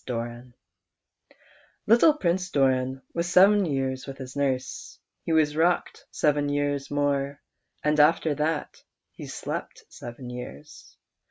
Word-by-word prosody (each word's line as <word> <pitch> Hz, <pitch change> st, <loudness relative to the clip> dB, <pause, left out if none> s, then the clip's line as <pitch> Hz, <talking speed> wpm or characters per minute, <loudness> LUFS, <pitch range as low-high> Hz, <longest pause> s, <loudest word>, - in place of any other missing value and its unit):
^l5V"'^^V^ 120 Hz, 0 st, -5 dB, 1.3 s
ITTLE 240 Hz, +8 st, +6 dB
Prince 185 Hz, -, 0 dB
Doran 130 Hz, -3 st, +1 dB
was 170 Hz, 0 st, -1 dB
sev^en 190 Hz, 0 st, +5 dB
years 130 Hz, -1 st, -2 dB
with 135 Hz, 0 st, -7 dB
his 130 Hz, -1 st, -9 dB
nurse; 130 Hz, -2 st, -2 dB, 0.2 s
he -, -, -4 dB
was 155 Hz, -2 st, +3 dB
rocked 170 Hz, +3 st, 0 dB
seven 145 Hz, -1 st, +1 dB
years 145 Hz, -1 st, -1 dB
more, 140 Hz, -1 st, -1 dB, 0.4 s
and 150 Hz, 0 st, +2 dB
after 155 Hz, +1 st, +4 dB
that 150 Hz, +2 st, -2 dB, 0.3 s
he -, -, -10 dB
slept -, -, -6 dB
seven 120 Hz, +1 st, -9 dB
years. 125 Hz, -, -10 dB
145 Hz, 120 wpm, -26 LUFS, 130-160 Hz, 1.3 s, ITTLE